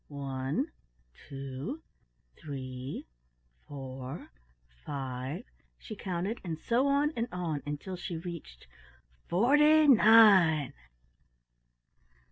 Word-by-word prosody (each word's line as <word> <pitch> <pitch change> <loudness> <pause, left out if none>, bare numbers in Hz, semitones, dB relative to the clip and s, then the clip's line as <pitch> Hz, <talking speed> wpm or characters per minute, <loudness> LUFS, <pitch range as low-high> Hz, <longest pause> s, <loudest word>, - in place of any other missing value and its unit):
"One, 140 - -3 0.4
two, 140 - -7 0.5
three, 130 -2 -7 0.6
four, 135 - -8 0.5
five," 135 - -5 0.3
she 215 - -9
counted, 190 +3 -3
and 165 -4 -4
so 240 - +1
on 285 +2 +2
and 230 0 -1
on 170 -5 -3
until 150 +6 -5
she 175 -1 -5
reached 165 - -8 0.6
"FORTY 295 - +5
NINE!" 205 - +6
165 Hz, 85 wpm, -30 LUFS, 135-225 Hz, 0.6 s, NINE